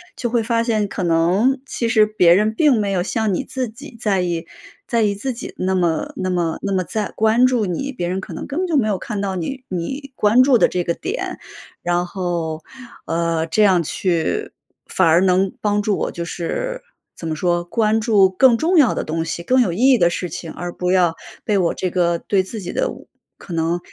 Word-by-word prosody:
就 240 - -3
会 235 -1 +2
发 230 +1 0
现， 220 -3 0
可 195 - -4
能 180 +11 +2
其 235 - -2
实 220 -2 +4
别 180 -5 +4
人 210 +4 +3
并 295 0 +4
没 200 -1 -1
有 180 -2 0
像 220 +2 -1
你 180 - -1
自 260 -2 -3
己 240 +4 -12
在 200 -5 +1
意 170 -2 -2 0.4
在 235 -1 +1
意 210 -2 +2
自 255 +6 -3
己 240 - -8
那 190 +1 0
么 170 -4 0
那 185 0 -2
么 175 -3 -1
那 200 - -3
么 190 - +1
在 215 0 -3
关 220 +3 +3
注 250 -4 +2
你， 200 +10 -3
别 210 -10 -4
人 185 +2 -2
可 - - -9
能 - - -6
根 280 - -5
本 370 - 0
就 325 -4 +1
没 230 -6 +2
有 205 -3 0
看 210 +2 -5
到 195 -1 -2
你 250 +10 -5
你 265 - -5
关 215 +3 +4
注 260 -2 +5
的 - - +4
这 180 - -1
个 170 - 0
点。 395 - -5 0.4
然 175 0 0
后， 170 -4 -3 0.4
呃， 165 -1 0
这 210 +6 +2
样 185 -4 +4
去 180 - -1 0.4
反 185 - +2
而 165 +1 +5
能 190 0 +2
帮 205 0 +1
助 205 -1 0
我， - - -2
就 170 - -5
是 - - -4 0.4
怎 165 - -6
么 160 - -2
说， 175 +1 0
关 220 +3 +1
注 210 -4 +4
更 235 +6 +4
重 340 +7 +2
要 280 -7 +5
的 - - -2
东 160 +1 -2
西、 165 +1 -4
更 255 +8 +3
有 185 -8 +1
意 - - -5
义 255 - +5
的 175 -5 +4
事 175 +1 -4
情， 165 -1 -7
而 175 0 -5
不 180 +1 -2
要 180 -3 +3 0.3
被 210 - +1
我 175 -3 +1
这 185 - -2
个 170 -1 +1
对 195 +2 +1
自 210 +3 -7
己 175 - -5
的 - - 0 0.5
可 - - -12
能 165 +1 0
195 Hz, 245 characters per minute, -20 LUFS, 175-230 Hz, 0.5 s, 注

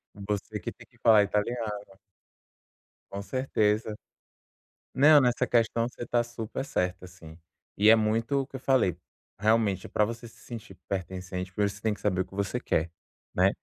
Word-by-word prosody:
Você 105 +2 -4
que - - -5
tem - - -16
que - - -27
falar 110 -2 +6
italiano. 105 0 -2 1.3
Com 100 - -4
certeza. 110 -3 0 1.0
Não, 145 +2 +7
nessa 125 -2 +2
questão 115 0 +2
você 120 - -8
está 120 0 +1
super 120 +2 -5
certa, 90 -4 -2
assim. 85 -3 -13 0.4
E 105 +2 +6
é 115 - +9
muito 115 +5 +1
o 135 - -5
que 135 - -8
eu - - -11
falei: 125 - +2 0.4
realmente, 105 -3 +2
pra 105 - +1
você 115 +2 -4
se 115 - -18
sentir 110 -5 -9
pertencente, 95 0 -4
primeiro 100 0 +1
você 100 - -12
tem 110 -1 +1
que - - -11
saber 95 -3 +1
o - - -2
que - - -15
você 100 +5 -1
quer, 80 -6 0 0.4
né? 95 +2 +4
105 Hz, 170 wpm, -28 LUFS, 95-120 Hz, 1.3 s, é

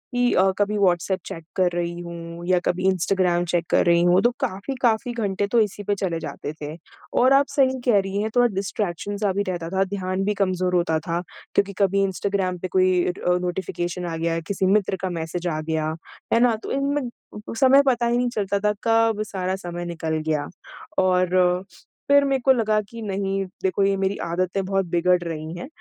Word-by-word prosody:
कि 245 0 +3
अ, 185 - +4
कभी 205 +1 +1
WhatsApp 185 -1 +2
check 165 - -7
कर 180 -2 +2
रही 175 0 -2
हूँ 170 0 -8
या 180 -1 +3
कभी 180 - 0
इंस्टाग्राम 180 -1 +2
चेक 175 -1 0
कर - - +3
रही 170 -1 +4
हूँ, 175 +2 +4
तो 240 - +3
काफ़ी, 200 +9 -3
काफ़ी 240 0 +1
घंटे 205 -3 -1
तो 235 +3 +2
इसी 210 -1 0
पे 205 +1 0
चले 180 -4 -2
जाते 150 -2 -6
थे। 150 +1 -5 0.5
और 260 +2 +5
आप 275 +1 +4
सही 260 -2 +2
कह 230 -5 +5
रही 195 +1 -2
हैं, 215 - -1
थोड़ा 245 0 +5
डिस्ट्रैक्शन 200 0 -3
सा 200 -1 +1
भी 200 +2 0
रहता 170 -2 -3
था, 190 +2 +1
ध्यान 190 -1 -2
भी 210 - +1
कमज़ोर 185 -2 0
होता 160 -2 +2
था 170 +1 -1 0.3
क्योंकि 200 0 +2
कभी 195 0 +3
इंस्टाग्राम 190 -1 -1
पे 185 - -3
कोई 185 0 +4
इट 180 +1 -1
अ, 180 0 +2
नोटिफ़िकेशन 180 0 -3
आ 165 -1 -3
गया, 165 0 0
किसी 190 +3 -2
मित्र 195 0 +2
का 190 - -1
मैसेज 170 +2 -4
आ 155 -2 -1
गया, 155 0 -2 0.4
है 230 - +5
ना? 240 -1 +4
तो - - -5
इनमें 280 +1 0
अ - - -4 0.4
अ, - - -4
समय 270 +1 +7
पता 240 -2 +2
ही 235 0 +2
नहीं 245 0 +1
चलता 200 -3 -1
था, 210 +1 +1
कब 225 -1 +3
सारा 185 -1 -2
समय 175 -2 -6
निकल 165 -2 -3
गया। 155 -2 0 0.6
और 180 0 +2 0.4
फिर 285 0 +6
मेरे 270 -1 +1
को 265 - +7
लगा 220 -4 +2
कि, 230 +3 -10
"नहीं, 195 -1 -2 0.2
देखो 190 +1 +1
ये 195 0 +3
मेरी 195 +1 0
आदतें 180 +3 -1
बहुत 195 0 0
बिगड़ 175 +1 +2
रही 160 -1 -5
हैं।" 255 - -6
190 Hz, 210 wpm, -23 LUFS, 175-210 Hz, 0.6 s, समय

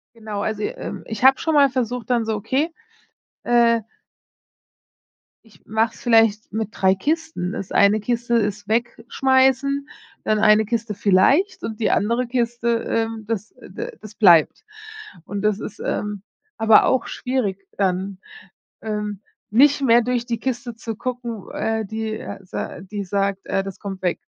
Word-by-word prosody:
Genau, 215 -2 -5
also, 215 0 -2
ähm, - - -5
ich 220 0 -6
habe 265 0 +7
schon 320 - -1
mal 285 -1 +6
versucht 250 -2 -3
dann 240 -2 +2
so, 220 0 -1
okay, 265 - -1 0.7
äh 235 -1 +4 1.6
ich 220 -2 -22
mache 220 +1 0
es - - -15
vielleicht 225 -3 +3
mit 220 0 -2
3 190 0 +3
Kisten. 300 - -2
Das 195 - -6
eine 200 +2 +4
Kiste 235 +2 -1
ist 205 -2 0
Wegschmeißen, 260 +4 +1 0.4
dann 215 - +2
eine 215 0 +5
Kiste 230 -1 -2
vielleicht 210 - +3
und 220 -1 -5
die 220 - +1
andere 235 +4 +1
Kiste, 235 -1 -1 0.2
ähm, 225 -1 -1
das, 215 -1 -3
äh, - - -15
d 475 - -5
das 215 0 -11
bleibt. 175 -7 +5 0.6
Und 200 +3 -5
das 210 -1 +1
ist, 210 - -8
ähm, 210 -2 -3 0.4
aber 220 -1 +6
auch 260 - +1
schwierig 205 -7 -3
dann, 190 0 -1 0.6
ähm, 210 -2 -4 0.3
nicht 280 +6 +5
mehr 240 -2 +5
durch 245 0 -1
die 235 -2 -2
Kiste 240 -1 -4
zu 225 -1 -6
gucken, 240 -3 -5
äh, 220 0 -1
die, 220 +1 -4
äh, - - -7
s 185 - -24
äh, - - -4
die 200 +1 -5
sagt 195 0 -1
äh, 195 - 0
das 195 -1 -8
kommt 195 -2 -6
weg. 180 -2 0
225 Hz, 160 wpm, -22 LUFS, 205-240 Hz, 1.6 s, habe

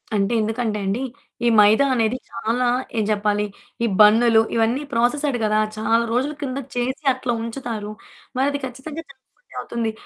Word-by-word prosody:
అంటే 200 +3 +1
ఎందుకంటే 220 0 -1
అండి, 205 +7 -1 0.4
ఈ - - +4
మైదా 215 +7 +6
అనేది 230 +1 +1
చాలా 245 +3 -1 0.3
ఏం 215 - +2
చెప్పాలి? 210 0 +1 0.4
ఈ - - +3 0.2
బన్నులు 225 +1 +6
ఇవన్నీ 230 +5 +1
ప్రాసెస్డ్ 245 +3 +1
కదా! 215 0 +2 0.2
చాలా 225 +2 +2
రోజుల 265 +5 0
కిందట 270 -1 -4
చేసి 260 +4 -2
అట్లా 250 -1 -2
ఉంచుతారు. 230 -3 -5 0.5
మరది 285 +2 +1
ఖచ్చితంగా 275 +6 -7
జంక్ 265 -1 -16 0.2
ఫుడ్డే - - -21
అవుతుంది 230 -2 -3
235 Hz, 150 wpm, -22 LUFS, 220-260 Hz, 0.5 s, మైదా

